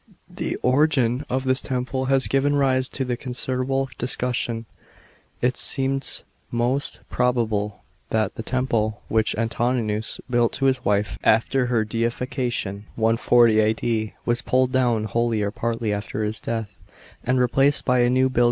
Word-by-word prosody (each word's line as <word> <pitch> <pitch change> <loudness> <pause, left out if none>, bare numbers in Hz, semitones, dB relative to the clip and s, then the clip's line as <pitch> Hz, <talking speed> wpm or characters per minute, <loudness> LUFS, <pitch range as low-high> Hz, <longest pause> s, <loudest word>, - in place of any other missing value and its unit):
The - - -2
origin 130 -1 +2
of 130 +1 -1
this 130 0 +2
temple 130 +1 -2
has 135 0 +2
given 140 +1 +2
rise 130 -2 +2
to 130 -3 -2
considerable 130 +2 -2
discussion. 120 -2 -1 0.8
It 125 +1 +2
seems 135 0 -1 0.3
most 120 +4 -1
probable 110 -5 0 0.3
that 110 -3 0
the - - -6
temple 115 -3 -1
which 110 0 +1
Antoninus 115 -1 -1
built 120 -2 +2
to 135 - -1
his 130 -2 +2
wife 100 0 0
after 125 +3 +3
her 115 -3 +1
deification 115 -2 -2
(140 115 0 +4
A.D.) 110 0 0
was 120 0 0
pulled 130 0 +1
down 120 -4 +2
wholly 115 0 0
or 100 - -1
partly 115 -1 -2
after 105 +1 -3
his 105 +1 -2
dea 115 0 -2
h, - - -7 0.6
and 130 +1 +1
replaced 135 +3 +2
by 125 -1 +3
a 120 0 +4
new 130 +1 +3
build. 130 -2 -1
120 Hz, 145 wpm, -23 LUFS, 110-130 Hz, 0.8 s, 140